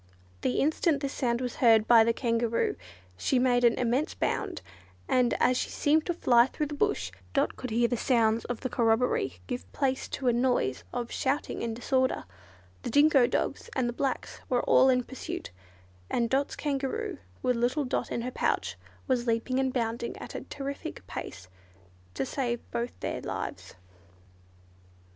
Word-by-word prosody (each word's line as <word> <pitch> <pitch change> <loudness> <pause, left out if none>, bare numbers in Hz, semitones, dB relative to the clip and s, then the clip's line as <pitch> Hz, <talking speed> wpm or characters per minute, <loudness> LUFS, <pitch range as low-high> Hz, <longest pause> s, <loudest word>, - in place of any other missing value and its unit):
The 125 - +1
instant 310 0 +2
this 275 -1 -2
sound 240 -2 0
was 250 -2 -3
heard 225 -3 +5
by 230 -2 +8
the 230 - +3
Kangaroo, 230 -1 0 0.4
she 260 - +1
made 245 -1 +3
an 235 - +5
immense 250 +5 0
bound, 390 -4 -2 0.4
and 250 -2 +3
as 250 0 +3
she - - -1
seemed 310 +2 +2
to 350 - +1
fly 240 -6 +5
through 300 - -3
the 295 - -6
bush, 95 - 0 0.2
Dot - - +2
could 255 - -6
hear 235 +2 +2
the 245 - -1
sounds 230 -2 +2
of 245 -2 -4
the - - -1
corroboree 230 +1 +1
give 250 -2 -5
place 265 -2 0
to 265 - -3
a 240 - +5
noise 240 - +1
of 240 -1 -4
shouting 275 +3 -1
and 230 -1 -2
disorder: 260 +2 0 0.6
the - - -4
dingo 285 -1 +5
dogs - - -2
and 255 - +1
the 240 - -2
Blacks 265 +2 -3
were 245 -1 +2
all 265 - +5
in 250 -1 +3
pursuit, 265 - -6 0.6
and 235 -1 0
Dot's 275 +2 +1
Kangaroo, 275 -3 -2 0.2
with 250 - +2
little 250 +5 +1
Dot 250 - -2
in 235 - -2
her 250 - -3
pouch, - - -1 0.3
was 250 -2 +1
leaping 230 +3 +1
and 265 -1 +1
bounding 235 -1 -2
at - - -8
a - - -4
terrific 275 - -6
pace 90 - -7 0.7
to 135 - -1
save 240 - -2
both 235 +1 -3
their - - -3
lives! - - -5
250 Hz, 170 wpm, -29 LUFS, 235-270 Hz, 0.7 s, by